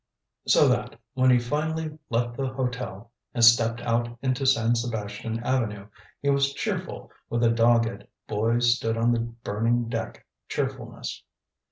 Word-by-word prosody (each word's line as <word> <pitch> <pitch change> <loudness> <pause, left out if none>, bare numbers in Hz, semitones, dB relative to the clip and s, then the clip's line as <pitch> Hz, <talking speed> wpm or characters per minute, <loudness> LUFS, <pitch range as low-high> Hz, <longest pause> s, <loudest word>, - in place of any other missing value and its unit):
So - - +6
that, - - 0
when 130 0 +3
he 125 - +6
finally 155 +5 -2
left 120 0 0
the 135 +1 -2
hotel 125 -4 -4 0.2
and 120 -1 +5
stepped 115 0 +5
out 120 0 -1
into 130 +1 0
San 120 -3 +3
Sebastian 115 -1 -3
Avenue, 105 -6 -1 0.3
he 140 - +3
was 140 0 +1
cheerful - - -4 0.2
with 120 0 0
a 115 - +5
dogged, 115 0 +2 0.2
boy 115 +3 +1
stood 120 -1 +2
on 115 +1 +3
the 120 - +1
burning 115 0 -1
deck 115 -2 -5 0.2
cheerfulness. - - -4
120 Hz, 145 wpm, -26 LUFS, 115-125 Hz, 0.3 s, So